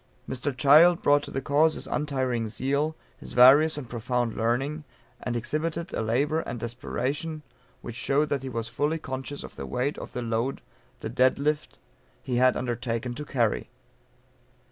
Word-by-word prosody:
Mr. 130 Hz, +1 st, -3 dB
Child 160 Hz, +6 st, +6 dB
brought 145 Hz, 0 st, +5 dB
to -, -, -8 dB
the 135 Hz, -, -4 dB
cause 155 Hz, +3 st, +3 dB
his -, -, -6 dB
untiring 130 Hz, -6 st, -1 dB
zeal, 140 Hz, +8 st, -1 dB, 0.2 s
his -, -, -9 dB
various 140 Hz, +6 st, +7 dB
and 140 Hz, -4 st, -6 dB
profound 120 Hz, 0 st, -2 dB
learning; 135 Hz, +7 st, -1 dB, 0.4 s
and 125 Hz, -, -3 dB
exhibited 160 Hz, +7 st, -3 dB
a -, -, -1 dB
labour, 140 Hz, +8 st, +1 dB
and 120 Hz, -, -5 dB
desperation 135 Hz, +6 st, -3 dB, 0.4 s
which 120 Hz, -, -6 dB
showed 145 Hz, +4 st, +1 dB
that 140 Hz, -2 st, 0 dB
he 135 Hz, -, -5 dB
was 115 Hz, -2 st, -3 dB
fully 145 Hz, +7 st, -1 dB
conscious 135 Hz, -1 st, -6 dB
of -, -, -10 dB
the -, -, -5 dB
weight 125 Hz, +4 st, -2 dB
of -, -, -9 dB
the 125 Hz, -, -3 dB
load 115 Hz, +3 st, -1 dB, 0.4 s
the -, -, -4 dB
dead 130 Hz, +2 st, +3 dB
lift 150 Hz, +2 st, -1 dB, 0.5 s
he 125 Hz, -2 st, -1 dB
had 130 Hz, 0 st, +4 dB
undertaken 120 Hz, -1 st, -2 dB
to 150 Hz, +4 st, -6 dB
carry. 120 Hz, -6 st, 0 dB
130 Hz, 165 wpm, -27 LUFS, 120-150 Hz, 0.5 s, various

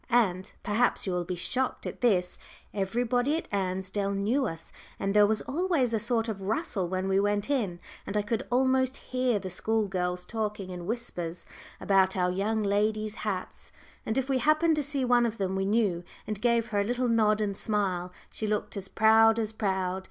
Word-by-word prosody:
And 195 Hz, -7 st, +2 dB
perhaps 225 Hz, +4 st, +1 dB
you 190 Hz, -, -1 dB
will 175 Hz, -1 st, -1 dB
be 180 Hz, +1 st, -3 dB
shocked 250 Hz, +9 st, -2 dB
at -, -, -6 dB
this 185 Hz, -7 st, +2 dB, 0.3 s
everybody 245 Hz, +8 st, 0 dB
at -, -, -6 dB
Ansdell 190 Hz, +1 st, -1 dB
knew 230 Hz, +7 st, +1 dB
us, 165 Hz, -3 st, -7 dB, 0.3 s
and 195 Hz, 0 st, 0 dB
there 210 Hz, 0 st, +6 dB
was 215 Hz, 0 st, 0 dB
always 300 Hz, -5 st, 0 dB
a -, -, +3 dB
little -, -, -2 dB
sort 230 Hz, -1 st, 0 dB
of 210 Hz, -3 st, -4 dB
rustle 200 Hz, -, -1 dB
when 185 Hz, +1 st, -1 dB
we 195 Hz, 0 st, +3 dB
went 205 Hz, +5 st, 0 dB
in, 205 Hz, -11 st, 0 dB, 0.3 s
and 205 Hz, -, -2 dB
I 210 Hz, -, +1 dB
could 215 Hz, +1 st, -2 dB
almost 260 Hz, +1 st, +2 dB
hear 255 Hz, -3 st, 0 dB
the 190 Hz, -2 st, -5 dB
school 220 Hz, +3 st, 0 dB
girls 180 Hz, -1 st, -2 dB
talking 210 Hz, -3 st, -3 dB
in 175 Hz, -1 st, -7 dB
whispers 180 Hz, -7 st, -4 dB, 0.3 s
about 190 Hz, -1 st, +3 dB
"our 180 Hz, 0 st, +2 dB
young 210 Hz, +4 st, 0 dB
ladies' 215 Hz, +1 st, 0 dB
hats;" 195 Hz, -4 st, -5 dB, 0.3 s
and 220 Hz, -, -2 dB
if 265 Hz, -1 st, 0 dB
we 265 Hz, -2 st, +1 dB
happened 310 Hz, +5 st, +3 dB
to -, -, +2 dB
see 280 Hz, -2 st, -1 dB
one 240 Hz, -1 st, +4 dB
of 230 Hz, 0 st, -5 dB
them 190 Hz, -1 st, -1 dB
we 195 Hz, 0 st, 0 dB
knew, 200 Hz, -5 st, +1 dB, 0.2 s
and 210 Hz, -1 st, -4 dB
gave 235 Hz, -1 st, +2 dB
her 205 Hz, -, 0 dB
a -, -, +3 dB
little 245 Hz, +4 st, 0 dB
nod 215 Hz, -2 st, +3 dB
and 205 Hz, -2 st, -1 dB
smile, 190 Hz, -4 st, -1 dB, 0.2 s
she 215 Hz, -, -4 dB
looked 210 Hz, 0 st, -2 dB
as 195 Hz, -1 st, -5 dB
proud 220 Hz, +2 st, +5 dB
as 220 Hz, -1 st, -1 dB
proud! 190 Hz, -3 st, -1 dB
210 Hz, 200 wpm, -28 LUFS, 190-240 Hz, 0.3 s, there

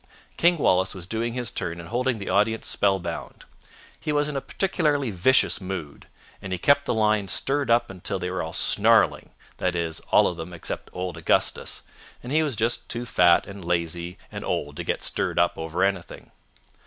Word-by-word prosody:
King 175 Hz, +1 st, +4 dB
Wallace 95 Hz, -, +2 dB
was 90 Hz, -2 st, -6 dB
doing 115 Hz, +4 st, -2 dB
his 120 Hz, -3 st, -2 dB
turn 85 Hz, 0 st, -4 dB
and 85 Hz, -, -9 dB
holding 125 Hz, +1 st, 0 dB
the 100 Hz, -, -7 dB
audience 105 Hz, +4 st, +1 dB
spellbound. 95 Hz, -3 st, -1 dB, 0.5 s
He 150 Hz, -, -3 dB
was 145 Hz, 0 st, +1 dB
in 150 Hz, -, -5 dB
a 135 Hz, -, -1 dB
particularly 150 Hz, -, 0 dB
vicious 110 Hz, +3 st, +3 dB
mood, 90 Hz, -6 st, -6 dB, 0.3 s
and 95 Hz, -, -7 dB
he 95 Hz, -, 0 dB
kept 140 Hz, +9 st, +3 dB
the -, -, 0 dB
lions 105 Hz, -3 st, +2 dB
stirred 140 Hz, -1 st, +1 dB
up 115 Hz, -3 st, +3 dB
till -, -, -1 dB
they 90 Hz, -1 st, -3 dB
were 95 Hz, -, -2 dB
all -, -, -4 dB
snarling, -, -, +3 dB, 0.3 s
that 90 Hz, -1 st, -1 dB
is, 85 Hz, -2 st, -1 dB
all -, -, +5 dB
of 85 Hz, -, -3 dB
them 85 Hz, +2 st, -7 dB
except 85 Hz, -, -5 dB
old 90 Hz, -2 st, -5 dB
Augustus, 80 Hz, -, 0 dB, 0.4 s
and 125 Hz, -, -7 dB
he 155 Hz, +2 st, +3 dB
was 145 Hz, -6 st, -1 dB
just 115 Hz, +3 st, -1 dB
too 120 Hz, +1 st, -3 dB
fat 90 Hz, -6 st, +4 dB
and 100 Hz, -1 st, -9 dB
lazy 85 Hz, +1 st, -2 dB
and -, -, -6 dB
old 75 Hz, 0 st, -2 dB
to -, -, -3 dB
get -, -, -2 dB
stirred -, -, -1 dB
up -, -, +3 dB
over 80 Hz, +3 st, -2 dB
anything. 95 Hz, -3 st, -2 dB
100 Hz, 190 wpm, -25 LUFS, 90-125 Hz, 0.5 s, all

